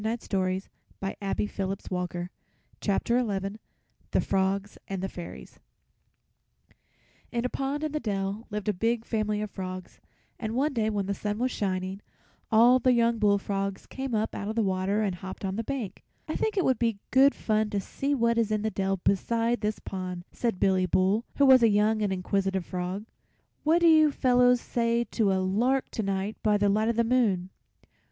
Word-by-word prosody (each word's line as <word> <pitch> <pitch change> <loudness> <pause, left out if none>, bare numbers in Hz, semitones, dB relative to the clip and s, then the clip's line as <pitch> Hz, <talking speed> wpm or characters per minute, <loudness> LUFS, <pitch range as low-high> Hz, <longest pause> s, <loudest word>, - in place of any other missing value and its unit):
THE 225 +2 0
FROGS 190 -3 -2 0.4
AND 195 - -2 0.2
THE - - 0
FAIRIES 195 -1 -4
[Illustration: 180 -1 -3 1.8
The - - +1
Frogs 195 +1 0
and 195 -1 -3
the - - 0
fairies] 175 -2 -9 1.7
In 235 0 -1
a - - 0
pond 275 +3 -2
in 305 -1 -2
a - - +1
dell 200 -1 -3
lived 210 -2 -4
a 210 - +2
big 225 +4 0
family 215 -2 -1
of 210 - -6
frogs, 185 -1 -7 0.4
and 220 0 -3
one 280 +3 +1
day 220 -3 +1
when 205 -2 -1
the 200 - -1
sun 210 +1 -3
was 250 +2 0
shining 190 -1 -2 0.5
all 240 +3 +6
the 255 0 +3
young 235 -1 +2
bullfrogs 200 -1 0
came 265 -3 -4
up 215 +1 -1
out 200 - -4
of 220 - -3
the 230 - +2
water 190 +2 0
and 200 -3 0
hopped 190 +2 -7
on 190 0 -2
the 225 - -2
bank. 250 -5 -5 0.2
"I - - -3
think 435 -1 -1
it 375 - +2
would 260 -3 +2
be 230 -3 +1
good 270 +2 +6
fun 215 -1 0
to 205 -1 -1
see 275 +8 -2
what 235 -2 +2
is 225 -2 +1
in 215 -1 0
the 220 - 0
dell 195 -1 0
beside 230 +5 +1
this 210 0 -1
pond," 180 -2 -6
said 230 -6 -2
Billy 185 -1 +3
Bull, 190 +6 +2
who 280 - +4
was 260 -2 +8
a 230 - +6
young 215 +1 +2
and 205 -2 +1
inquisitive 190 0 -1
frog. 185 +3 -4 0.6
"What 325 +3 +3
do 340 - +6
you 310 -2 +6
fellows 250 -2 +4
say 235 0 0
to 210 -4 +2
a - - +2
lark 235 +8 +1
to - - -2
night 195 +1 -2
by 210 -1 +3
the 205 0 +2
light 215 +3 +2
of 235 - 0
the 235 - +3
moon?" 215 -7 +1
210 Hz, 190 wpm, -28 LUFS, 195-235 Hz, 1.8 s, was